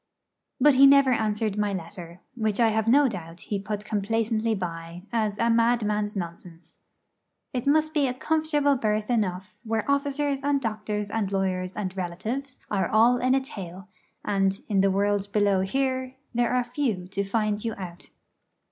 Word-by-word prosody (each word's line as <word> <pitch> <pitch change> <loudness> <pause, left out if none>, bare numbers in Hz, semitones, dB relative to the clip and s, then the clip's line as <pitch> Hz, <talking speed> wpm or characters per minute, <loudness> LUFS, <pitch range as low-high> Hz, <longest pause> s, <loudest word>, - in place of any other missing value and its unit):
But 295 -1 +6
he 275 +1 +8
never 275 -1 +6
answered 215 -2 0
my 205 -1 0
letter; 175 -1 -8
which 220 -3 -1
I 230 -1 +5
have 220 0 0
no 280 +4 +5
doubt 170 -6 -7
he 205 - -3
put 210 +1 -5
complacently 220 +1 0
by, 170 -2 -6
as 215 -3 0
a 230 - +1
madman's 215 -3 +1
nonsense. 170 -2 -8 0.7
It 255 +1 -3
must 310 +2 +3
be 290 -3 +2
a 250 - -1
comfortable 300 -1 +1
berth 215 -1 -1
enough 195 -3 -1
where 225 -1 -1
officers 280 0 0
and 285 0 +2
doctors 215 -3 -3
and 210 -3 -1
lawyers 185 -1 -1
and 190 -3 -4
relatives 215 +10 -4
are 195 -2 0
all 230 +3 +5
in 255 +2 +2
a 270 - +2
tale, 190 - -9 0.4
and, 195 -1 +1
in 200 -2 +2
the 195 - +3
world 200 +1 0
below 205 -2 +3
here, 260 +5 -1 0.2
there 240 0 +1
are 250 0 +2
few 235 -9 -2
to 195 +1 -2
find 210 +1 -1
you 225 -2 -2
out. 175 -3 -9
215 Hz, 165 wpm, -26 LUFS, 195-250 Hz, 0.7 s, he